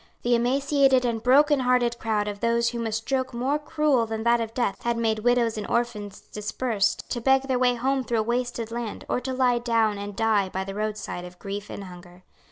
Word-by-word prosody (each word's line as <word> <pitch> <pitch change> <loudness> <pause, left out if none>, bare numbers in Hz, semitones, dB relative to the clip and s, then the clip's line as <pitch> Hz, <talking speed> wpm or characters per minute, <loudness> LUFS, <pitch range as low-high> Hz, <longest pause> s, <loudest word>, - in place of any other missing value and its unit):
The 240 - +2
emaciated 265 +2 +3
and 230 -2 -1
brokenhearted 250 -3 +3
crowd 215 -2 -1
of 205 -1 -5
those 235 +1 +2
whom 235 -1 -3
a - - -3
stroke 255 +3 -2
more 265 +5 0
cruel 300 -6 +1
than 220 0 -4
that 235 0 +3
of 225 0 -5
death 220 -6 -1
had 235 0 -1
made 220 -2 0
widows 235 -1 +2
and 205 - -5
orphans 225 -4 -2
dispersed, 210 0 -2
to 240 - -2
beg 265 +2 +4
their 260 -2 0
way 250 -1 +3
home 265 +2 0
through 235 -2 -1
a - - +1
wasted 240 -1 -2
land, 235 -2 -5
or - - 0
to 255 +1 -4
lie 255 -2 +2
down 225 -3 +1
and 205 0 -6
die 210 -3 +2
by 190 +1 -3
the 195 0 -6
roadside 210 -3 -4
of 180 0 -11
grief 200 +1 -6
and 200 - -7
hunger. 180 -1 -13
235 Hz, 210 wpm, -25 LUFS, 215-250 Hz, -, beg